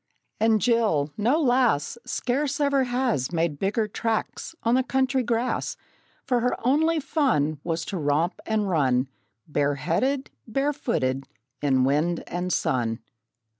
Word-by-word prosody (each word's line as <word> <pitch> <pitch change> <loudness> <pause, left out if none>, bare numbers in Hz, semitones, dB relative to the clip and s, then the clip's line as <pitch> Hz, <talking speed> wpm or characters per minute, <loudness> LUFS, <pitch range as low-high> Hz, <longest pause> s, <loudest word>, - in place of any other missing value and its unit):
And 220 0 +4
Jill! 210 -12 +2
no 240 +9 +2
lass 245 - +2
Scarce 280 +3 -1
ever 280 -2 +2
has 245 - 0
Made 165 -4 -1
bigger 210 +3 0
tracks 225 +8 -3
on 230 - +2
the 260 - +4
country 265 0 +1
grass; 240 +1 -1 0.5
For 250 -2 +2
her 250 +1 +1
only 315 +5 +3
fun 155 - +1
Was 165 -1 -2
to 190 - -4
romp 150 +4 0
and 215 -2 0
run, 135 -7 +2 0.4
Bare 145 -1 +1
headed, 260 - -1 0.2
bare 275 +6 0
footed, 135 - -1 0.3
in 130 -3 +3
wind 150 +6 +1
and 180 +1 -3
sun. 115 -7 0
220 Hz, 135 wpm, -25 LUFS, -, 0.5 s, And